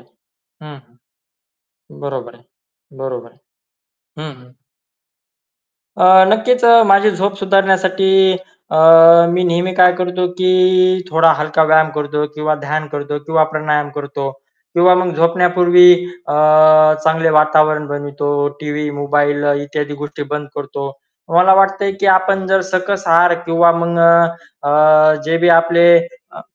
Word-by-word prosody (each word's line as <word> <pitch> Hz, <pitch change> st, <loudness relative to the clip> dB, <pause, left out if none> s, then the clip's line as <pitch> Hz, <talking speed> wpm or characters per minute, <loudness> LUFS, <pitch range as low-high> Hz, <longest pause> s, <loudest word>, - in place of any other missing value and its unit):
आहे. -, -, -29 dB, 0.5 s
हं, 150 Hz, -1 st, -13 dB, 0.9 s
हं, 70 Hz, -, -22 dB
बरोबर 125 Hz, -4 st, -8 dB
आहे. 120 Hz, 0 st, -25 dB, 0.5 s
बरोबर 125 Hz, -3 st, -8 dB
आहे. -, -, -33 dB, 0.8 s
हं, 155 Hz, -1 st, -9 dB
हं. 125 Hz, 0 st, -22 dB, 1.5 s
अ, -, -, +2 dB, 0.3 s
नक्कीच 245 Hz, +3 st, 0 dB
अ, 235 Hz, 0 st, +5 dB
माझी 200 Hz, +2 st, +3 dB
झोप 195 Hz, +1 st, -4 dB
सुधारण्यासाठी 190 Hz, -1 st, 0 dB, 0.6 s
अ, -, -, -3 dB, 0.6 s
मी 180 Hz, +1 st, -1 dB
नेहमी 175 Hz, +1 st, -2 dB
काय 180 Hz, -1 st, +4 dB
करतो 180 Hz, 0 st, -3 dB
की 185 Hz, 0 st, 0 dB, 0.6 s
थोडा 160 Hz, 0 st, +2 dB
हलका 155 Hz, +1 st, -1 dB
व्यायाम 155 Hz, 0 st, +2 dB
करतो 150 Hz, 0 st, -4 dB
किंवा 155 Hz, 0 st, -3 dB
ध्यान 155 Hz, +2 st, -4 dB
करतो 145 Hz, 0 st, -6 dB
किंवा 160 Hz, -1 st, 0 dB
प्राणायाम 150 Hz, -1 st, -3 dB
करतो 140 Hz, -1 st, -6 dB, 0.4 s
किंवा 180 Hz, +1 st, +3 dB
मग 180 Hz, -1 st, -2 dB
झोपण्यापूर्वी 175 Hz, +1 st, +2 dB, 0.4 s
अ, -, -, -3 dB, 0.7 s
चांगले 160 Hz, 0 st, 0 dB
वातावरण 155 Hz, 0 st, +1 dB
बनवतो. 145 Hz, 0 st, -6 dB, 0.3 s
टीव्ही, 150 Hz, 0 st, -5 dB
मोबाईल 145 Hz, 0 st, -2 dB, 0.2 s
इत्यादी 145 Hz, 0 st, -6 dB
गोष्टी 150 Hz, 0 st, -8 dB
बंद 150 Hz, -1 st, -6 dB
करतो. 140 Hz, -1 st, -7 dB, 0.4 s
मला 185 Hz, +2 st, +4 dB
वाटतंय 195 Hz, +1 st, 0 dB
की 200 Hz, -, -1 dB
आपण 190 Hz, 0 st, +1 dB
जर 190 Hz, 0 st, 0 dB
सकस 190 Hz, +1 st, -3 dB
आहार 170 Hz, +1 st, +3 dB
किंवा 170 Hz, 0 st, +2 dB
मग 170 Hz, 0 st, -3 dB
अ, 170 Hz, -2 st, 0 dB
अ, 155 Hz, +1 st, +3 dB
जे 165 Hz, +1 st, -1 dB
बी 175 Hz, -, +1 dB
आपले 170 Hz, +1 st, +1 dB, 0.5 s
अ -, -, -13 dB
165 Hz, 135 wpm, -14 LUFS, 150-180 Hz, 1.5 s, अ